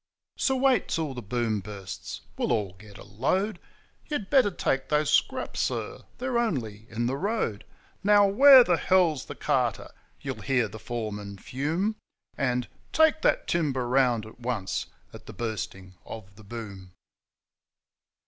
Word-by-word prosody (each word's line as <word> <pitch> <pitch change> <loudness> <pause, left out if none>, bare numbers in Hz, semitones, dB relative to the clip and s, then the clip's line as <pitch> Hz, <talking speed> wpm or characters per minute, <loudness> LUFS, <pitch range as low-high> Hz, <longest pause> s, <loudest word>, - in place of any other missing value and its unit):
So 265 - +2
wait 260 -5 +3
till 160 -4 -2
the 125 - -6
Boom 115 0 -1
bursts! 100 -2 -7
we'll - - -1
all 100 -5 0
get 100 +2 -14
a - - -11
load. 140 - -1 0.5
'You 300 - -2
had 205 -9 -4
better 265 -7 +5
take 135 -7 -1
those 150 0 +2
scraps, - - +1
sir, - - -2 0.2
they're 250 -1 0
only 115 - -2
in 115 +2 -2
the 130 +3 0
road.' 180 - -1 0.4
'Now, 205 0 +6
where 260 +5 +9
the 175 -6 +2
hell's 175 -7 +2
the - - -8
carter?' - - 0 0.3
you'll - - -5
hear 130 -4 +1
the 110 +2 -10
foreman 105 -4 -5
fume; 165 - -2 0.4
And, 125 -2 0 0.2
'Take 315 0 +4
that - - +2
timber 140 -7 0
round 125 -3 +2
at 110 - -13
once!' 115 -6 -2 0.3
at - - -12
the - - -8
Bursting 100 -5 -5
of 100 -3 -10
the 110 - -15
Boom. 100 -4 -8
125 Hz, 155 wpm, -27 LUFS, -, 0.5 s, where